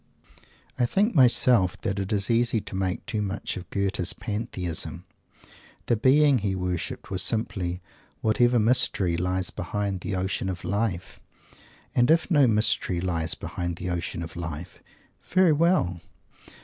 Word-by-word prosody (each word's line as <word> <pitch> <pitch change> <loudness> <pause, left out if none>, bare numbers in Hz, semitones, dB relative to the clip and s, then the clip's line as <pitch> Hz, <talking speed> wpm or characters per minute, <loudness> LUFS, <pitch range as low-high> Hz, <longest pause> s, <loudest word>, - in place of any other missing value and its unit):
I 120 - +3
think 205 - +1
myself 120 - +4
that 100 -3 -2
it 95 -1 -4
is 100 +1 0
easy 115 0 +2
to 100 - -8
make 95 -1 -2
too 115 -4 -2
much 100 -1 -3
of 95 - -8
Goethe's 95 -2 -1
Pantheism. 105 -7 -3 0.8
The 120 - +2
Being 135 +3 +4
he 100 -2 -1
worshipped 90 -1 -4
was 95 -2 +1
simply 95 -5 -2 0.4
"Whatever 120 +3 +3
Mystery" 105 -6 +2
lies 90 +2 -1
behind 100 +1 -3
the 100 - -3
ocean 95 +1 -2
of 90 -1 -5
Life. 95 -1 -2 0.7
And 120 +2 +3
if 165 +3 +3
no 145 -5 +5
"mystery" 105 -5 +1
lies 85 -3 -1
behind 85 -1 -4
the 90 +1 -4
ocean 85 0 -3
of 80 - -9
life, 85 -1 -7 0.4
very 185 -3 +3
well! 150 - +1
100 Hz, 145 wpm, -26 LUFS, 90-120 Hz, 0.8 s, no